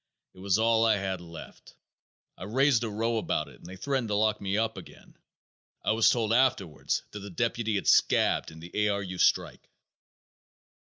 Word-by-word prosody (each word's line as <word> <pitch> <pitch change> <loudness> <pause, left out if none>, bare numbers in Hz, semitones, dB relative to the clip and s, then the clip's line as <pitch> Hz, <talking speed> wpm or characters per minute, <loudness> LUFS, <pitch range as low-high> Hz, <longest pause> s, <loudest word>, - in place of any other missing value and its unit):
It - - -17
was 95 +1 +1
all 115 0 +3
I 110 -2 +3
had 95 -2 -3
left. 85 -2 -12 0.6
I - - -9
raised 130 +2 +2
a 115 - -2
row 115 +2 -1
about 110 - -1
it - - -16
and - - -14
they 95 - -9
threatened 130 +4 -2
to 105 - -1
lock 105 0 +1
me 100 +1 -1
up 110 0 -1
again. 95 - -13 0.7
I - - +2
was 110 0 +4
told 115 -2 +1
afterwards 125 - 0
that 105 - -7
the 100 0 -9
deputy 115 +2 -1
had 100 - -2
scabbed - - +3
in 80 - -13
the 85 +1 -11 0.2
A. - - +1
R. 100 0 -1
U. 90 -1 -7
strike." - - +1
105 Hz, 195 wpm, -28 LUFS, 95-115 Hz, 0.7 s, was